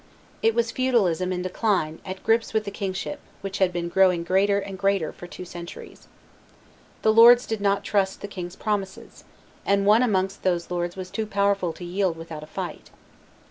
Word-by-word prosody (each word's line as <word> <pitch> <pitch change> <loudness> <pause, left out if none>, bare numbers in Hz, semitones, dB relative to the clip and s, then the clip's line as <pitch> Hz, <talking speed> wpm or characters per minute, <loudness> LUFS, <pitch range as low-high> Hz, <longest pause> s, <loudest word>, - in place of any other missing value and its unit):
It 225 0 +3
was 235 -1 +1
feudalism 195 -9 +1
in 180 -1 -2
decline 185 -4 -1
at 190 0 -7
grips 225 0 +1
with 220 - +2
the 200 - -6
kingship, 195 +7 -4 0.2
which 195 0 -5
had 190 -2 +3
been 175 -1 -3
growing 180 -1 +3
greater 195 +3 +2
and 195 -1 -4
greater 195 -4 0
for 175 - -10
two 180 - -9
centuries. 175 -1 -10 1.0
The 220 - +4
lords 240 +2 +8
did 220 -2 -3
not 200 -1 +1
trust 195 -2 0
the 205 - -5
king's 180 -3 -7
promises; 200 -3 -4 0.4
and 200 0 +2
one 215 +3 +6
amongst 195 -5 0
those 175 -2 -1
lords 175 0 -2
was 185 -1 -7
too 220 -1 -3
powerful 200 -3 +1
to 175 - -9
yield 180 -1 -1
without 165 -2 -8
a 155 - -10
fight. - - -6
195 Hz, 180 wpm, -25 LUFS, 180-205 Hz, 1.0 s, lords